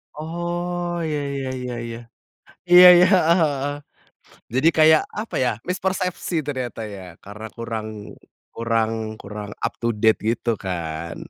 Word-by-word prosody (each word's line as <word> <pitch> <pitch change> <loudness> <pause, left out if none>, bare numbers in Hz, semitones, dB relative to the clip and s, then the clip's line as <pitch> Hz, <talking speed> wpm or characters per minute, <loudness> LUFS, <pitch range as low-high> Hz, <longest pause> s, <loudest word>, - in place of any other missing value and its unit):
Oh, 175 +2 -3
iya 150 -2 -2
iya 135 -1 -4
iya 125 -1 -5
iya. 115 0 -6 0.7
Iya 180 +1 +10
iya, 180 +1 +6 0.2
heeh 170 +2 +5
heeh. 145 -2 -1 0.8
Jadi 135 +5 +4
kayak 155 0 +6 0.2
apa 225 - -7
ya, 125 - +2 0.2
mispersepsi 185 -1 -2
ternyata 130 -5 -4
ya, 95 - -9 0.2
karena 105 +2 -9
kurang 115 -2 -4 0.7
kurang 115 -1 0 0.3
kurang 105 0 -7 0.2
up - - -4
to 115 - -2
date 110 0 +4
gitu 120 +1 0
kan? 85 -2 -4
135 Hz, 135 wpm, -22 LUFS, 110-175 Hz, 0.8 s, Iya